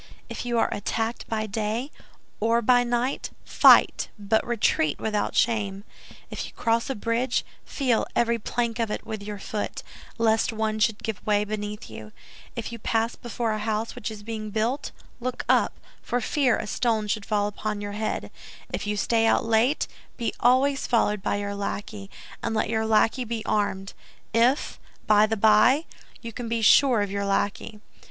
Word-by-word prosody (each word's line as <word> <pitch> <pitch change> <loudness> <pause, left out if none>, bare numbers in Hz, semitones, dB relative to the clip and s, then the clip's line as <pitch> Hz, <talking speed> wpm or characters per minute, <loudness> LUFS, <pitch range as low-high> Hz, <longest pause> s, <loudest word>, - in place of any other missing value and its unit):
If - - -5
you 240 -1 0
are - - +2
attacked 225 +3 -3
by 215 -1 -1
day 220 +6 -2 0.5
or 230 +2 +2
by 245 +2 +5
night, 245 +2 -1 0.2
fight, - - +5
but 210 +2 +1
retreat, 205 -10 +1
without 210 -1 -1
shame; 205 -4 +1 0.5
if - - -4
you - - -14
cross 230 +2 0
a 270 - -1
bridge, 230 +4 0 0.2
feel 255 -6 0
every 235 0 +2
plank 235 +1 -2
of 230 -2 0
it - - -4
with 220 -2 -5
your 205 0 -6
foot, 205 +1 -4 0.3
lest 225 -1 +2
one 220 -1 -1
should 220 -2 +1
give 220 -4 -4
way 210 -1 +2
beneath 210 0 -5
you; 110 -1 -10 0.4
if 235 -2 -4
you 235 - -7
pass 225 +2 0
before 235 -1 -3
a 215 - -2
house 215 +1 -2
which 210 - -5
is 215 -2 -9
being 215 -1 -5
built, 225 +6 -1 0.3
look 255 0 -4
up, - - +3 0.3
for 245 - -1
fear 255 0 +2
a - - -4
stone 220 -1 0
should 210 0 -1
fall 205 -1 0
upon 210 0 -3
your 205 0 -5
head; 215 +1 -3 0.4
if - - -3
you 210 0 -1
stay 225 +2 +2
out 235 - +3
late, 230 +5 +2 0.3
be 235 - -2
always 270 +3 +3
followed 210 -4 +2
by 200 - 0
your 200 0 -3
lackey, 200 0 -5 0.3
and 225 - -2
let 215 - 0
your 220 -1 0
lackey 225 +3 +3
be 225 -1 -4
armed—if, 210 +5 -1 0.3
by 215 0 +5
the 220 0 -1
by, 220 +9 +5 0.4
you 230 -1 -6
can 240 0 -5
be 230 -1 -1
sure 245 -2 +6
of 200 - -4
your 200 0 -2
lackey. 200 +2 -1
220 Hz, 175 wpm, -25 LUFS, 210-235 Hz, 0.5 s, sure